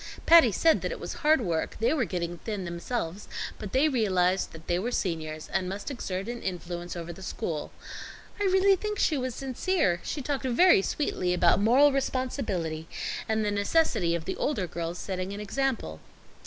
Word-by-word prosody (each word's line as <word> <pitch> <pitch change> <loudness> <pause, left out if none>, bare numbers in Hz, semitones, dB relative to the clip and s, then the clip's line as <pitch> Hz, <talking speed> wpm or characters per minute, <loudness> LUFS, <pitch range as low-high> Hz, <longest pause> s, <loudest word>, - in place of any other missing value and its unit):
Patty 330 -9 +8
said 320 - +3
that - - -2
it - - -5
was - - -5
hard 310 -3 +4
work, 170 -7 -2
they 235 +6 +2
were 275 -7 +1
getting 175 -1 -4
thin 205 -2 -4
themselves, 175 +2 -4 0.3
but 210 -3 -6
they 275 +4 +4
realized 190 -8 +1
that 160 0 -12
they 175 0 0
were 225 +6 -2
seniors 155 -7 -3
and 185 -1 -1
must 200 +7 -5
exert 195 -6 -4
an 240 0 -5
influence 175 -1 -5
over 170 0 -6
the 190 - -12
school. 160 -4 -4 0.7
I 410 - +1
really 385 +1 +5
think 420 +2 -4
she 315 - +2
was 255 -3 -2
sincere. 265 - 0
She 285 - -4
talked 280 0 -2
very 300 - +5
sweetly 185 -7 -1
about 175 +2 +4
moral 260 +7 +6
responsibility, 225 - -2 0.4
and 220 -1 +1
the 205 - 0
necessity 205 - +2
of 165 -1 -4
the - - -3
older 215 -11 0
girls 170 0 -4
setting 185 +1 -4
an 200 - -6
example." 210 - -2
200 Hz, 180 wpm, -28 LUFS, 175-270 Hz, 0.7 s, Patty